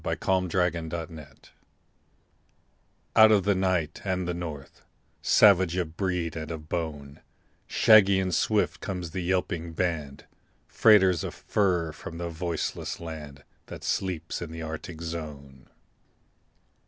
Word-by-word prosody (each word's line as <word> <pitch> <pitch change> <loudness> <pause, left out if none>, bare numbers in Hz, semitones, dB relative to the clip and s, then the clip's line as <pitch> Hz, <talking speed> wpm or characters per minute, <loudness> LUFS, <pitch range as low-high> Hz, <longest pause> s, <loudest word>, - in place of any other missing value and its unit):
THE - - -1
TRAIN 90 -3 0
DOGS 85 0 -5 2.0
Out 110 0 +8
of 100 -3 +4
the 100 +1 +3
night 90 -5 -1
and 95 -2 -2
the 90 - -1
north; 80 -5 -7 0.4
Savage 95 -4 +5
of 85 -3 -3
breed 90 -3 -2
and 80 -1 -5
of 80 -2 -7
bone, 75 -4 -5 0.5
Shaggy 100 -3 +6
and 95 -1 -1
swift - - +1
comes 90 -4 -5
the 90 - -3
yelping 85 -2 -2
band, 80 -6 -3 0.4
Freighters 95 -6 +4
of - - -5
fur 90 -6 0
from 85 +1 -9
the 85 0 -4
voiceless 85 0 -4
land 75 -4 -8 0.2
That - - -9
sleeps 90 -4 -2
in 85 -2 -6
the 80 0 -6
Arctic 80 +1 -7
zone. 75 -5 -7
85 Hz, 130 wpm, -27 LUFS, 80-95 Hz, 2.0 s, Out